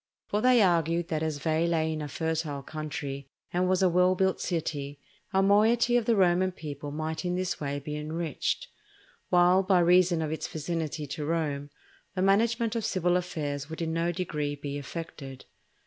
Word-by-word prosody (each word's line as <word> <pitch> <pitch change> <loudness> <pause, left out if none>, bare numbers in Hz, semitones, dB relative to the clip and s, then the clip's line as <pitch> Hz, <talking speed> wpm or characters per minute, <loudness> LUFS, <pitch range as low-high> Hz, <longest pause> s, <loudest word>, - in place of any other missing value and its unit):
For 210 - -1
they 250 -2 +5
argued 170 -1 +2
that 155 -2 -1
as 155 -2 -1
Veii 160 +2 +1
lay 160 -1 +1
in 155 - -4
a 150 - -4
fertile 155 -1 -2
country 145 -2 -5 0.2
and 180 +1 +1
was 185 0 +2
a - - +6
well 180 +1 +3
built 190 0 +1
city, 145 -5 -3 0.3
a 190 -1 +3
moiety 225 +4 +4
of 240 -2 +2
the 230 - +3
Roman 185 -1 +3
people 145 -4 -7
might 155 +1 -3
in 180 0 -1
this 185 -2 -2
way 140 -1 -2
be 150 +1 -5
enriched; 155 0 -2 0.6
while, 180 +1 +5
by 190 -1 +3
reason 175 -1 +4
of 155 - -3
its 160 - -3
vicinity 155 -1 -3
to 145 +2 -5
Rome, 145 -3 -2 0.5
the 185 - 0
management 230 +3 +2
of 230 - -1
civil 180 -4 +1
affairs 150 -5 -3
would 160 - -6
in 165 -1 -2
no 165 +1 +1
degree 150 -5 -2
be 145 0 -5
affected. 140 -3 -8
165 Hz, 180 wpm, -28 LUFS, 150-185 Hz, 0.6 s, a